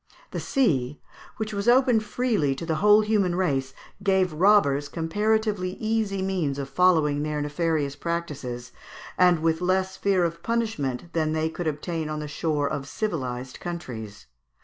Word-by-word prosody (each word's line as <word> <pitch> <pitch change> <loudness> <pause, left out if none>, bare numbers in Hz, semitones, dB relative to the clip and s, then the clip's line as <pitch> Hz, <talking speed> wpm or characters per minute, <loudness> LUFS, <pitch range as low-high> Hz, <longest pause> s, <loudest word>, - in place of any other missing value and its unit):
The - - -3
sea, 150 - 0 0.4
which 215 -1 -3
was 200 +1 -3
open 250 -2 +5
freely 215 - 0
to 150 - -6
the 160 -1 -1
whole 210 +4 +6
human 210 -5 +1
race, 135 -8 0 0.3
gave 190 -3 +2
robbers 155 -6 +3
comparatively 205 +3 0
easy 215 -3 -1
means 175 -8 -1
of 140 -1 -4
following 155 -3 +3
their 150 0 -2
nefarious 145 -1 -1
practices, 145 -7 -4 0.4
and 180 -3 +4
with 165 0 +1
less 190 +1 0
fear 195 -3 +2
of 170 0 -2
punishment 175 - -2
than 155 -2 0
they 160 0 0
could 165 +1 -4
obtain 155 +1 -3
on 155 - -3
the 150 - -5
shore 150 -1 -1
of 140 -1 -4
civilised 130 - -4
countries. 125 -12 -7
170 Hz, 150 wpm, -25 LUFS, 145-195 Hz, 0.4 s, whole